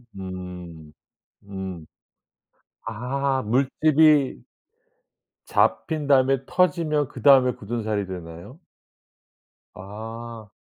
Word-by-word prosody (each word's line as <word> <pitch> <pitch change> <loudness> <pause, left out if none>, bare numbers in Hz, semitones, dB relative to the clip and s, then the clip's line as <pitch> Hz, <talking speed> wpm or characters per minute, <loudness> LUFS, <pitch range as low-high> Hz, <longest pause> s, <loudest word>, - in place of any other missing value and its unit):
음. 90 -4 -8 0.5
음. 95 -4 -7 1.0
아 130 +4 -1
물집이 140 +4 +3 1.0
잡힌 155 -3 0
다음에 135 -1 +4
터지면 165 -5 +1
그다음에 130 -4 +4
굳은살이 110 -2 -3
되나요? 90 - -9 1.1
아. 110 +2 -9
115 Hz, 145 characters per minute, -24 LUFS, 95-140 Hz, 1.1 s, 다음에